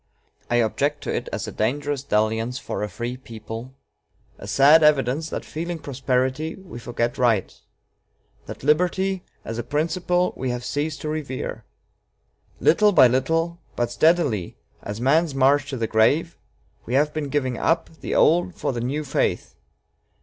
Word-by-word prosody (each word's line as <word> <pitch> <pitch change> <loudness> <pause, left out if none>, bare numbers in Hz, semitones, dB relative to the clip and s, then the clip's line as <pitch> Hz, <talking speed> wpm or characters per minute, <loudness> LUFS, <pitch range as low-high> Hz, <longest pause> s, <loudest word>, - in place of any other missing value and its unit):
I 120 - +1
object 140 +6 0
to - - -2
it - - -3
as - - -4
a - - -5
dangerous 145 +5 -1
dalliance 110 0 0
for - - -5
a 105 - -2
free 120 +3 -5
people 115 +1 -9 0.6
a 100 - -9
sad 140 +9 +6
evidence 150 0 +2
that, - - -5
feeling 170 +2 -4
prosperity, 135 +2 -1
we 190 -11 -10
forget 120 0 -2
right; 115 -6 +2 0.9
that - - -8
liberty, 180 +5 +1 0.2
as 115 +1 -4
a - - -2
principle, 175 +6 0
we 130 - -3
have 125 0 -3
ceased 145 0 -2
to 155 - -3
revere.... 150 -4 -4 0.9
Little 210 +5 +4
by 155 - +8
little, 165 +7 0 0.2
but 120 0 -1
steadily 145 - +2 0.2
as 105 +1 -6
man's 145 +4 +2
march 135 +1 +3
to 135 - -4
the 115 - -1
grave, 140 +10 +2 0.5
we 120 - -1
have 150 +2 +2
been 150 -2 -3
giving 130 -4 -1
up 165 +1 +1
the - - -3
old 175 +3 +3
for - - -2
the 120 - -3
new 140 +5 -2
faith. 145 - -1
140 Hz, 155 wpm, -23 LUFS, 120-160 Hz, 0.9 s, by